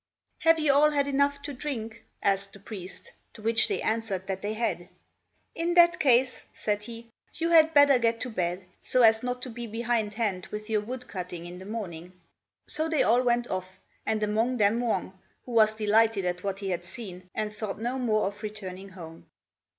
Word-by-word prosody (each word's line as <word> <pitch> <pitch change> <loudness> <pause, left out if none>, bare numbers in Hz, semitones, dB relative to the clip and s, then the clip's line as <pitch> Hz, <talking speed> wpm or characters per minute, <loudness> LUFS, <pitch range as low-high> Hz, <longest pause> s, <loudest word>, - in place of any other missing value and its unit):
"Have 330 0 +5
you 305 -3 +3
all 295 +2 +6
had 285 -2 +1
enough 280 0 +1
to 290 0 -5
drink?" 230 -5 -5 0.2
asked 195 0 +1
the 200 - -12
priest; 195 -2 -7 0.2
to 215 - -13
which 225 0 +3
they - - -2
answered 220 -4 -1
that 190 -1 -4
they 210 +1 -3
had. 180 -6 -2 0.6
"In 340 +1 -1
that 345 -1 +6
case," 255 -2 +3
said 210 -1 -1
he, 230 0 -10 0.2
"you 335 +1 -1
had 320 -1 +6
better 285 -3 +7
get 230 -1 +1
to 250 - -3
bed, 180 -2 -2 0.2
so 255 - +3
as 225 0 +6
not 250 0 -3
to 255 - -4
be 235 +1 -6
behindhand 220 -4 -1
with 210 +1 -7
your 215 -1 +2
wood 250 +3 -7
cutting 180 -2 -6
in 175 +1 -8
the 190 - -10
morning." 180 -6 -6 0.5
So 315 +1 0
they 315 -3 +2
all 240 +2 +4
went 240 -1 +1
off, 185 0 -4 0.3
and 220 -1 -1
among 225 +4 +1
them 210 +1 +3
Wang, 220 -6 -1 0.3
who 250 - -8
was 220 -2 +4
delighted 220 -1 +3
at 180 0 -2
what 195 -1 -2
he 195 -1 -4
had 175 -2 -2
seen, 185 -1 -8
and 210 -1 -2
thought 210 -2 -4
no 245 +4 -2
more 220 -4 +1
of 200 +1 -5
returning 195 -3 -6
home. 165 -3 -11
220 Hz, 195 wpm, -28 LUFS, 195-250 Hz, 0.6 s, better